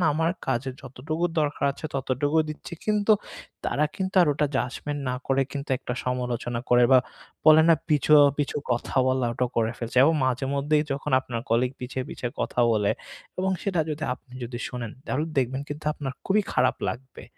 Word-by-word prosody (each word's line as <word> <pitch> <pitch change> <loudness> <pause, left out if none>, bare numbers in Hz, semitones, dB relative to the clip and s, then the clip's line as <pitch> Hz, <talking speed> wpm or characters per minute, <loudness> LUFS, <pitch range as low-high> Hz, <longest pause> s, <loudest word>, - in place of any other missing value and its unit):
না 170 - +3
আমার 165 +1 +1 0.2
কাজের 130 +1 -1
যতটুকু 145 +6 -4 0.2
দরকার 145 -1 -1
আছে 155 - -6
ততটুকুই 145 +4 +1
দিচ্ছি। 155 +3 -9
কিন্তু 210 0 +3 0.5
তারা 150 - +1
কিন্তু 190 0 -3
আর 170 - +3
ওটা 150 +1 +1
জাজমেন্ট 145 +3 -3
না - - -1
করে 135 0 +2
কিন্তু 140 0 -5
একটা 125 -2 -4
সমালোচনা 125 -1 -2
করে 120 0 +6
বা 130 - +9 0.5
বলে 155 0 +9
না 165 - +8
পিছু, 150 0 +2 0.3
পিছু, 145 - -1 0.2
কথা 120 +3 -3
বলাটা 125 -1 +1
করে 115 0 +2
ফেলছে। 120 +1 -6
এবং 160 +2 +4
মাঝেমধ্যেই 140 +4 +1
যখন 140 +1 -4
আপনার 120 -3 -5
কলিগ 125 +2 +2
পিছে, 125 +1 -5
পিছে, 120 - -5
কথা 125 - -1
বলে 105 -2 +2 0.5
এবং 190 +1 +1
সেটা 185 -5 0
যদি 155 +1 -4
আপনি 125 0 -18
যদি 120 0 -6
শোনেন 120 -3 -5
তাহলে 155 +2 -1
দেখবেন 130 +2 0
কিন্তু 150 +1 -7
আপনার 135 -3 -4
খুবই 205 +2 +3
খারাপ 130 - +2
লাগবে। 130 +1 -7
135 Hz, 175 wpm, -26 LUFS, 125-155 Hz, 0.5 s, বা